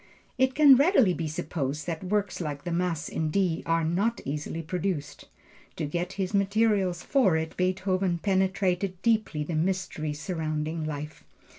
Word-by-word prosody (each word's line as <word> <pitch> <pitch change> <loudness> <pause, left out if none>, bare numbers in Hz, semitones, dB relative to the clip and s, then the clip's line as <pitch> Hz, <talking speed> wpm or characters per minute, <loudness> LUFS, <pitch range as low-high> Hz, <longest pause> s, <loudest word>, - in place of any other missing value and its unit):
It 260 0 +3
can 285 -3 +8
readily 275 - +4
be 165 -2 -3
supposed 150 -1 -3
that 165 0 -4
works 200 -1 -1
like 145 -3 -4
the 175 - -4
Mass 170 -2 -1
in 160 -1 -2
D 175 -1 +1
are 165 0 +2
not 195 +9 0
easily 150 +3 -4
produced. 160 -4 -3 0.5
To 160 - -2
get 175 +5 -3
his 190 0 -3
materials 200 -3 +2
for 210 - +3
it 160 0 -4
Beethoven 185 0 0
penetrated 190 0 0
deeply 215 -10 +1
the 165 - -5
mystery 160 -2 -1
surrounding 155 0 -3
life. 150 0 -6
180 Hz, 150 wpm, -27 LUFS, 155-195 Hz, 0.5 s, can